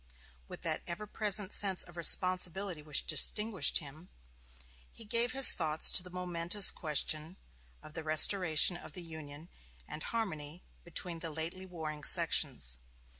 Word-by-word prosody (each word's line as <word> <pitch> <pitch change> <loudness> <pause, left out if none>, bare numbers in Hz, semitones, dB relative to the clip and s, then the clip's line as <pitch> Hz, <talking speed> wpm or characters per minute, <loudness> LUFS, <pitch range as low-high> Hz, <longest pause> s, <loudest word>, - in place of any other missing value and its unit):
With - - -12
that - - -3
ever 185 +5 -6
present 210 -1 -2
sense 195 -3 -1
of 175 - -17
responsibility 185 0 +1
which 150 -1 -3
distinguished 210 -2 0
him, 155 +3 -9 0.8
he 225 - -8
gave 235 +3 -1
his 270 0 +10
thoughts 155 -2 +1
to - - +4
the 180 - -13
momentous 180 +2 +2
question 155 +2 -2 0.5
of 155 - -14
the 160 - -7
restoration 160 +1 +4
of - - -13
the 180 - -9
Union 155 -1 -11 0.4
and 155 - -9
of - - -6
harmony 175 -8 -5 0.2
between 175 0 -6
the 165 - -6
lately 165 +4 -7
warring 155 -4 -8
sections. 60 +1 +1
175 Hz, 145 wpm, -31 LUFS, 155-190 Hz, 0.8 s, his